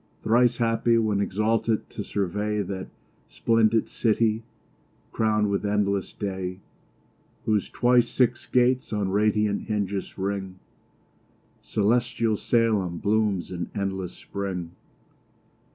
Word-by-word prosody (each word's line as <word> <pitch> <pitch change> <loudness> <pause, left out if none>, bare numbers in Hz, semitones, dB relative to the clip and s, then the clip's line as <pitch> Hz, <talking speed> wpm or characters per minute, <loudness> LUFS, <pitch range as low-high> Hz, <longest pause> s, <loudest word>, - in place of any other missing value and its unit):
Thrice 120 +1 +3
happy, 115 0 +2
when 105 -3 +1
exalted 110 +3 0
to 105 - -5
survey 105 +2 -1
That 95 -2 -5 0.4
splendid 115 -1 +2
city, 110 -1 +1 0.7
crown'd 105 -2 +1
with 100 - 0
endless 100 -1 0
day, 95 -2 -4 0.9
Whose 105 -2 +1
twice 120 0 +3
six 125 -2 +1
gates 125 +1 +2
on 105 -3 -1
radiant 105 +1 +1
hinges 100 -2 -2
ring: 95 -1 -3 1.0
Celestial 115 +1 +1
Salem 105 -6 +1
blooms 105 -3 0
in 85 -2 -4
endless 95 -3 -3
spring. 95 -4 -5
105 Hz, 105 wpm, -25 LUFS, 100-115 Hz, 1.0 s, Thrice